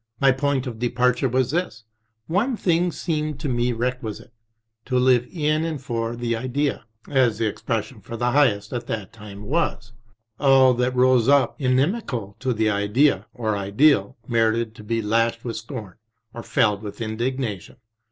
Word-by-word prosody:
My 135 -1 +5
point 135 0 0
of 115 -4 -6
departure 125 +2 +1
was 130 0 +1
this: 160 -10 -2 0.4
one 215 - 0
thing 175 -1 +1
seemed 155 -4 -3
to 155 - -2
me 120 -1 0
requisite, 120 -2 -4 0.5
to 125 -1 0
live 125 -1 +3
in 155 -2 0
and 160 -3 -3
for 115 -3 -3
The 120 -1 -1
Idea, 130 +2 -2 0.2
as 125 -6 +2
the 115 - 0
expression 110 +2 -3
for 115 +3 -7
the 120 +1 0
highest 110 -7 +2
at 120 -1 -4
that 105 -4 -4
time 105 -2 -10
was. 115 -3 -2 0.5
All 135 -2 +6
io6 - - -5
REMINISCENCES 125 +1 +1
that - - 0
rose 130 -2 +4
up 140 +1 +3
inimical 130 - 0
to 130 0 -1
The 110 -2 +1
Idea 105 +1 +2
or 110 -4 -1
Ideal 130 +7 +2
merited 115 -1 +1
to 105 - -13
be 115 +1 -1
lashed 115 +2 0
with 115 -2 -3
scorn 110 -4 -8 0.4
or 120 - -6
felled 110 -3 +1
with 105 0 -8
indignation. 115 -2 -3
120 Hz, 170 wpm, -23 LUFS, 110-135 Hz, 0.5 s, All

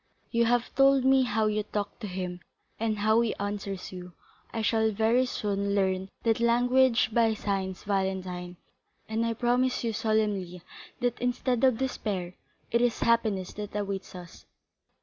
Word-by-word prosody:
You 235 -1 +3
have 240 +1 +1
told 270 -1 +4
me 265 0 +5
how 220 -3 +1
you 215 0 +1
talk 205 -1 -4
to 215 - -5
him 180 -1 -4 0.4
and 220 -1 0
how 220 +2 +3
he 230 -2 0
answers 200 -2 -4
you; 180 -1 -9 0.4
I 225 -1 -3
shall 220 0 +2
very 225 +4 +2
soon 200 -3 -1
learn 190 -1 0
that 225 -1 +2
language 245 0 +3
by 225 -1 +3
signs, 195 -3 -3
Valentine, 185 -3 -2 0.5
and 220 +1 -1
I 230 0 -1
promise 250 +2 +1
you 230 -1 -1
solemnly, 205 -5 -1 0.4
that 245 -1 -1
instead 245 0 0
of 260 -4 +4
despair, 200 -8 -3 0.4
it 235 +1 +3
is 245 -1 +1
happiness 220 -5 +1
that 210 0 -7
awaits 200 -2 -4
us." 175 -2 -11
215 Hz, 155 wpm, -28 LUFS, 195-235 Hz, 0.5 s, me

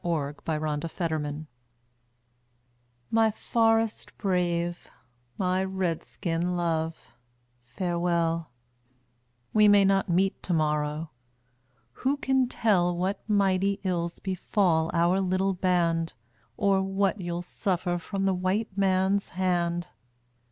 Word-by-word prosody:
A 155 -5 -1
CRY 155 +1 -3
FROM 155 - -5
AN 155 -1 0
INDIAN 165 -2 -2 0.2
WIFE - - -18 1.6
My 225 0 +4
forest 225 0 0
brave, 175 -3 -1 0.5
my 185 0 +1
Red 190 -4 -2
skin 175 0 -2
love, 165 -4 -2 0.5
farewell; 170 +3 -1 1.0
We 210 -1 +6
may 205 -1 +6
not 195 0 +2
meet 190 +3 +1
to 180 - -2
morrow; 150 0 0 0.9
who 275 +3 +1
can 265 -2 +2
tell 180 -7 +2
What 190 +3 -1
mighty 195 -1 +2
ills 170 -2 -1
befall 180 -3 +1
our 175 +2 +2
little 190 +1 +1
band, 170 -3 +1 0.4
Or 195 -1 +3
what 195 +1 0
you'll 175 0 -3
suffer 180 -1 -1
from 195 +2 -3
the 195 - +3
white 190 +3 -1
man's 195 0 +2
hand? 175 -1 -1
180 Hz, 115 wpm, -27 LUFS, 170-195 Hz, 1.6 s, We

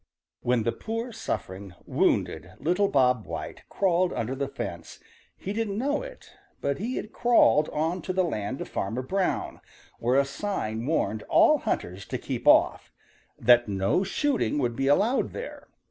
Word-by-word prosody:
= - - -66
|WHEN 120 -2 +1
the 115 - +1
poor 230 - -4
suffering, 95 - -5
wounded - - 0
little 180 +5 +1
Bob 125 - +2
White - - -6
crawled 185 -2 +2
under 115 +3 -2
the 140 +1 -2
fence 85 -11 -7 0.4
he 195 - -5
didn't 210 -2 -2
know 285 +5 0
it, - - -11 0.3
but 140 +3 -1
he 240 +6 -3
had 215 - -5
crawled 235 -10 +4
on 165 +4 -1
to - - -3
the 185 0 +2
land 125 - -3
of - - -5
Farmer 115 +7 -3
Brown, 190 +7 -1 0.4
where 125 +3 +3
a 140 - +3
sign 140 - -3
warned 110 -9 0
all - - +5
hunters 95 +2 -3
to - - -3
keep - - -5
off - - +4 0.5
that 120 -1 +5
no 100 - +1
shooting 215 - 0
would 120 -4 0
be 135 +2 -1
allowed 205 - +2
there. 485 - -7
145 Hz, 165 wpm, -27 LUFS, -, 0.5 s, all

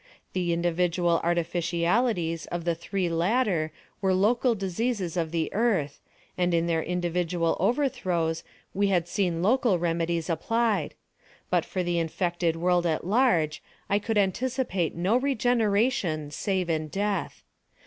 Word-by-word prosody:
The 180 -2 0
individual 170 0 +1
artificialities 170 +2 0
of 175 -1 -4
the 170 - +2
three 180 +3 -2
latter 170 -1 +1 0.3
were 190 -1 +2
local 235 +5 +2
diseases 195 -1 -2
of 165 -3 -1
the 160 -1 -2
Earth, 190 -11 0 0.4
and 180 -1 +1
in 165 0 +2
their 165 -1 +1
individual 175 0 0
overthrows 180 - 0 0.3
we 200 +1 +2
had 175 -3 +1
seen 175 -3 -1
local 235 -2 +3
remedies 170 -1 -1
applied; 225 +6 0 0.6
but - - +2
for 185 - -2
the 175 -1 0
infected 170 0 -1
world 175 +1 +2
at 160 0 -1
large 185 - +2 0.3
I 200 - +4
could 220 +1 -2
anticipate 205 - 0
no 185 +8 +2
regeneration 225 - +1
save 190 +1 -1
in 155 -2 -1
death. 200 +4 -2
180 Hz, 130 wpm, -27 LUFS, 170-205 Hz, 0.6 s, I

